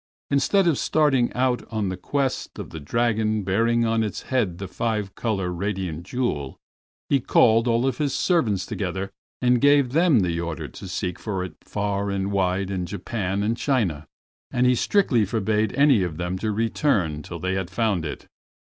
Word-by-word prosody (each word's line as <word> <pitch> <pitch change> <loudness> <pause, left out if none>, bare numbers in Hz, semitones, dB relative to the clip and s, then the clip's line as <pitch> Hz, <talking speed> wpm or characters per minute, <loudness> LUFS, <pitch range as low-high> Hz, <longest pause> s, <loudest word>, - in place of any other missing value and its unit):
Instead 160 +8 +3
of 165 -5 +2
starting 140 -6 +2
out 125 0 +1
on 110 -4 -1
the 95 - -3
quest 135 +7 -2
of - - -7
the 80 - -6
dragon 110 +5 0
bearing 115 +5 +2
on 115 0 +1
its 105 -3 -3
head 110 -10 0
the 95 +1 -5
five 105 0 -2
color 95 -6 -2
radiating 95 -3 -3
jewel, 90 - -3 0.5
he 140 - +3
called 115 -1 +4
all 115 0 +2
his 145 0 -2
servants 115 - +1
together 95 0 -3 0.3
and 125 -1 +4
gave 140 -3 +4
them 160 - +4
the 85 -2 0
order 85 -2 -4
to - - -10
seek 90 -1 -3
for 95 -4 -3
it 90 - -6
far 100 0 -2
and 100 0 -1
wide 95 0 0
in 90 -2 -2
Japan 100 0 -3
and 105 - +1
in - - -1
China, 100 - 0 0.4
and 125 0 +1
he 125 - +5
strictly 125 - +2
forbade 110 +1 0
any 140 -5 +5
of 85 -4 -2
them 90 +1 -2
to 110 +1 -1
return 105 - 0
till 85 +3 -7
they 95 +3 -2
had 95 -2 -2
found 100 -3 0
it. 75 -3 -6
105 Hz, 180 wpm, -24 LUFS, 95-120 Hz, 0.5 s, he